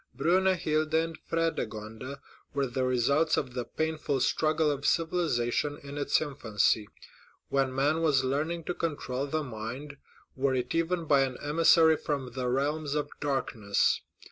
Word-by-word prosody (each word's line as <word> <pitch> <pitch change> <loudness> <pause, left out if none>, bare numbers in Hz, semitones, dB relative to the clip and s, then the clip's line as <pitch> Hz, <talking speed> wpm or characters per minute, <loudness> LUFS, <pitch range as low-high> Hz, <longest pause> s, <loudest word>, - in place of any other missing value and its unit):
Brunhilda 160 -1 +2
and 165 0 -1
Fredegund 125 -6 -3 0.4
were 140 -1 +1
the 130 +1 -2
results 130 +5 +2
of 125 - -2
the 125 -1 -2
painful 155 -1 -2
struggle 155 +2 +2
of 140 -1 -4
civilization 150 -5 +1
in 140 0 -8
its 140 - +2
infancy, 110 -7 0 0.6
when 135 -1 +1
man 145 +5 +1
was 145 -5 +3
learning 155 +6 -1
to 180 - -2
control 145 -5 -3 0.2
mind, 130 +4 -6 0.4
were 135 0 +1
it 125 -1 -2
even 165 +1 0
by 145 -2 +4
an 130 -2 -1
emissary 160 +1 +5
from 140 -5 -3
the 125 0 -3
realms 145 +3 0
of 150 - -2
darkness. 115 -8 0
145 Hz, 140 wpm, -29 LUFS, 130-160 Hz, 0.6 s, emissary